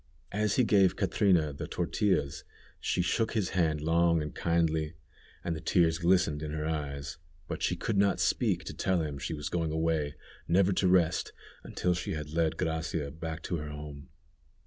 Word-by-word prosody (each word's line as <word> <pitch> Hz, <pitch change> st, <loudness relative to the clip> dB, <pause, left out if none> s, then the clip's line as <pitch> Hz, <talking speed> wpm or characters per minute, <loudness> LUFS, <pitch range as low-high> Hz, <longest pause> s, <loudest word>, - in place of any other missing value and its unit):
As 105 Hz, 0 st, +1 dB
he 130 Hz, -, +4 dB
gave 95 Hz, -4 st, +4 dB
Catrina 90 Hz, -6 st, +2 dB
the -, -, -6 dB
tortillas 75 Hz, -9 st, 0 dB, 0.4 s
she 90 Hz, -, 0 dB
shook 110 Hz, +6 st, 0 dB
his 105 Hz, -5 st, 0 dB
hand 80 Hz, -5 st, +1 dB
long 85 Hz, +1 st, +3 dB
and 75 Hz, -1 st, -4 dB
kindly, 80 Hz, -2 st, 0 dB, 0.5 s
and 85 Hz, -, -1 dB
the 80 Hz, -, -6 dB
tears 80 Hz, -1 st, +2 dB
glistened 85 Hz, -4 st, +2 dB
in 75 Hz, -, -4 dB
her 75 Hz, 0 st, -2 dB
eyes, 70 Hz, -3 st, -4 dB, 0.3 s
but -, -, -5 dB
she -, -, +1 dB
could 105 Hz, -3 st, -1 dB
not 100 Hz, -1 st, +3 dB
speak -, -, +1 dB
to -, -, -6 dB
tell 95 Hz, -3 st, 0 dB
him 75 Hz, -2 st, -4 dB
she 80 Hz, +4 st, -3 dB
was 75 Hz, -1 st, -5 dB
going 80 Hz, 0 st, -1 dB
away, 80 Hz, -2 st, 0 dB, 0.3 s
never 95 Hz, +3 st, +4 dB
to 95 Hz, -, +2 dB
rest, 90 Hz, -1 st, +2 dB, 0.3 s
until 90 Hz, -, 0 dB
she 85 Hz, 0 st, -3 dB
had 75 Hz, -1 st, -5 dB
led 80 Hz, -1 st, +1 dB
Gracia 80 Hz, -2 st, -2 dB
back 80 Hz, +1 st, -6 dB
to 85 Hz, -, -2 dB
her 75 Hz, -1 st, -5 dB
home. 75 Hz, -1 st, -8 dB
80 Hz, 180 wpm, -30 LUFS, 75-90 Hz, 0.5 s, he